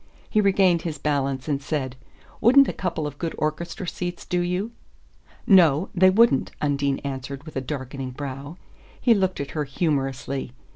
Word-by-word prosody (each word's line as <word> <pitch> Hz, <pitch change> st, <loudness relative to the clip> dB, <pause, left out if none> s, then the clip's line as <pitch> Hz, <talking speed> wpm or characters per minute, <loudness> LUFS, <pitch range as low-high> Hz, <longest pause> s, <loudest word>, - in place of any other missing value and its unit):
He 215 Hz, -, +2 dB
regained 190 Hz, -4 st, +3 dB
his 165 Hz, -3 st, -4 dB
balance 140 Hz, -2 st, -1 dB
and 140 Hz, -2 st, -1 dB
said: 135 Hz, -3 st, -3 dB, 0.5 s
"Wouldn't 270 Hz, +5 st, +7 dB
a -, -, -2 dB
couple 170 Hz, -4 st, -3 dB
of 145 Hz, -1 st, -6 dB
good 165 Hz, -2 st, -3 dB
orchestra 170 Hz, +4 st, -3 dB
seats 175 Hz, 0 st, -4 dB
do 180 Hz, -, 0 dB
you?" 180 Hz, +5 st, -2 dB, 0.7 s
"No; 175 Hz, -3 st, +5 dB
they 185 Hz, -1 st, +6 dB
wouldn't," 210 Hz, -, +4 dB
Undine 140 Hz, -1 st, 0 dB
answered 140 Hz, 0 st, -5 dB
with 155 Hz, -, -11 dB
a 135 Hz, -, -1 dB
darkening 135 Hz, 0 st, -5 dB
brow. 140 Hz, +4 st, -7 dB, 0.4 s
He 240 Hz, -, +5 dB
looked 190 Hz, -3 st, 0 dB
at 140 Hz, -, -4 dB
her 150 Hz, -, -1 dB
humorously. 135 Hz, -3 st, -2 dB
150 Hz, 160 wpm, -24 LUFS, 135-180 Hz, 0.7 s, Wouldn't